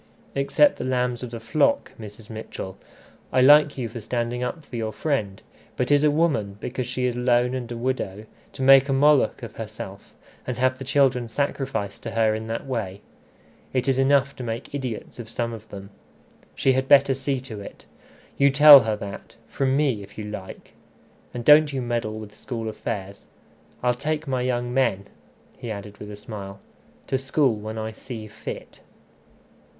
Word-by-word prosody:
"Except 140 - +3
the - - -4
lambs 125 -2 -1
of 125 - -5
the 115 0 -7
flock, 280 - +1
Mrs. 105 0 -10
Mitchell. 110 -4 -7 0.6
I 130 - +3
like 145 +2 +6
you 125 -3 -2
for 115 +1 -8
standing 120 +2 -2
up 140 +5 -4
for - - -10
your 110 -2 -2
friend; 110 -9 -2 0.3
but 125 +2 0
is 145 0 +5
a 150 - +5
woman, 145 -11 0
because 125 +1 -4
she 125 +1 -2
is 125 -1 0
lone 125 0 +2
and 125 -2 -4
a 120 - -4
widow, 115 -5 -3 0.3
to 135 - -8
make 135 +1 +7
a - - +2
Moloch 140 -1 +3
of 115 - -8
herself, 105 -3 -8 0.4
and 125 -3 -3
have 130 +1 +1
the - - -5
children 135 -3 +2
sacrificed 135 -3 -3
to 115 - -5
her 110 -1 +3
in 110 +1 -4
that 115 +4 -4
way? 105 -7 -4 0.7
It's 130 +1 +1
enough 140 0 +3
to 130 - -6
make 115 +3 -5
idiots 130 -5 -5
of 115 -1 -8
some 115 0 -3
of 110 -1 -10
them. 100 0 -9 0.6
She 135 - +3
had 130 +1 0
better 140 -1 +6
see 135 0 -2
to 115 -5 -8
it. - - -11 0.5
You 140 0 +6
tell 145 +1 +10
her 110 -3 -1
that 100 -1 -8
from 135 +2 0
me, 135 -8 +1
if 100 +1 -13
you 105 - -5
like. 105 -3 -9 0.6
And 120 -1 -6
don't 150 0 +7
you 135 - -2
meddle 120 -3 -2
with 105 -1 -9
school 115 -1 -5
affairs. 100 -3 -6 0.6
I'll 125 0 +3
take 150 +4 -3
my 130 -2 -1
young 120 -1 -1
men," 100 -7 +1 0.5
he 120 - -6
added 100 -1 -7
with 105 - -8
a 105 - -7
smile, 100 -2 -8 0.5
"to 130 - -1
school 135 -1 +2
when 110 +1 -6
I 110 0 -3
see 110 0 -8
fit." 110 +1 -9
125 Hz, 185 wpm, -24 LUFS, 110-135 Hz, 0.7 s, tell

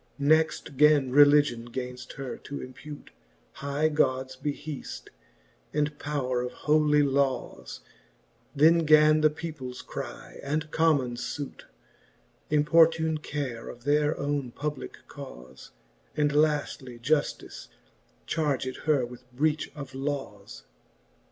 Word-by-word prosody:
Next 150 -1 +2
gan 145 -3 +5
Religion 145 -4 +5
gainft 125 0 -6
her 135 -2 -6
to 140 - -7
impute 145 +3 -10 0.4
High 140 +2 -1
Gods 130 -4 0
beheaft, 145 +1 -6 0.7
and 150 0 0
powre 130 -4 -1
of 125 - -4
holy 150 -1 +3
lawes: 135 -2 -1 0.7
Then 160 +4 +6
gan 155 -1 +5
the 155 - +5
peoples 150 -5 -7
cry - - -8
and 150 +2 -2
commons 140 -7 +2
fute 145 -1 -7 0.8
Importune 160 +1 +4
care 140 -6 -5
of 120 - -11
their 150 +2 +2
ovvne 140 -4 -2
publicke 150 -2 -5
caufe 65 +2 -11
j - - -10
And 145 - +2
laftly 145 -4 0
Jujlice 145 +5 -1 0.6
charged 140 -5 -1
her 145 -5 +3
with 125 +1 -13
breach 150 +4 0
of 140 -3 -8
lawes. 130 - -5
145 Hz, 115 wpm, -27 LUFS, 130-150 Hz, 0.8 s, Then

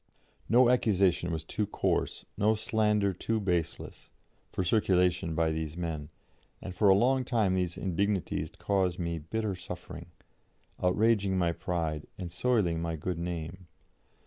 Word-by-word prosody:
No 120 +2 +6
accusation 100 -8 +2
was 80 -1 -3
too 105 +5 -2
coarse, - - -1
no 110 +2 +3
slander 105 -2 +1
too 110 +5 -1
baseless, 90 -5 -3 0.4
for 95 - -2
circulation 90 -3 +2
by 80 0 +2
these 80 0 -4
men; 80 -4 -4 0.5
and 95 - -7
for 100 +2 +3
a 95 - +7
long 130 +5 +3
time 110 -7 +1
these 90 -2 -1
indignities 95 +1 -1
caused 95 -3 0
me 85 -2 -2
bitter 110 +6 -2
suffering, 90 -1 -8 0.7
outraging 100 +1 +2
my 85 -2 +2
pride, 80 -3 -3
and 90 -3 -6
soiling 95 -5 +1
my 85 -1 -2
good 85 +2 -3
name. 85 +1 -5
90 Hz, 140 wpm, -30 LUFS, 85-105 Hz, 0.7 s, a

